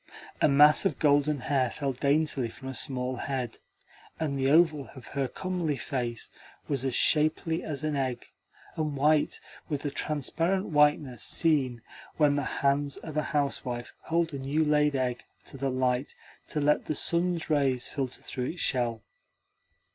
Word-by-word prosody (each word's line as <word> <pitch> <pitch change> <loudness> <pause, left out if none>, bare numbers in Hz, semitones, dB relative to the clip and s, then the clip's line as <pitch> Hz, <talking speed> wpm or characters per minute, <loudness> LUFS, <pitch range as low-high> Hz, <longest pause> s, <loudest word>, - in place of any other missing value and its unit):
A - - +6
mass 150 +1 +6
of 195 - 0
golden 145 -1 +2
hair 130 -1 +1
fell 135 +2 -3
daintily 140 -1 +1
from 120 +4 -9
a - - -5
small 130 -1 0
head, 125 -4 -3 0.6
and 155 -3 -1
the 135 0 +1
oval 155 -2 +3
of 130 - -11
her 135 -1 -1
comely 175 0 -2
face 120 -1 -4 0.4
was 140 -3 -1
as 130 -3 -1
shapely 155 +1 +2
as 155 -1 -4
an 155 -1 -1
egg, 130 -3 -2 0.5
and 155 -3 -2
white 150 +2 +2 0.3
with 145 -3 -3
the 145 - -2
transparent 165 +7 -1
whiteness 145 - +2
seen 135 -8 +2 0.3
when 150 -2 +4
the 145 - 0 0.2
hands 140 +1 +2
of 155 -2 -8
a 155 - +2
housewife 135 -5 -2
hold 165 -1 0
a 140 - -4
new 145 +4 0
laid 150 -1 +2
egg 125 -2 -1 0.2
to - - -9
the 135 0 -2
light 130 +1 -1 0.3
to 150 - -2
let 150 +1 +2
the 155 - -2
sun's 170 +1 +1
rays 135 -4 +2
filter 135 -3 -4
through 125 - -4
its 165 +6 -5
shell. 120 -4 0
145 Hz, 160 wpm, -28 LUFS, 130-155 Hz, 0.6 s, A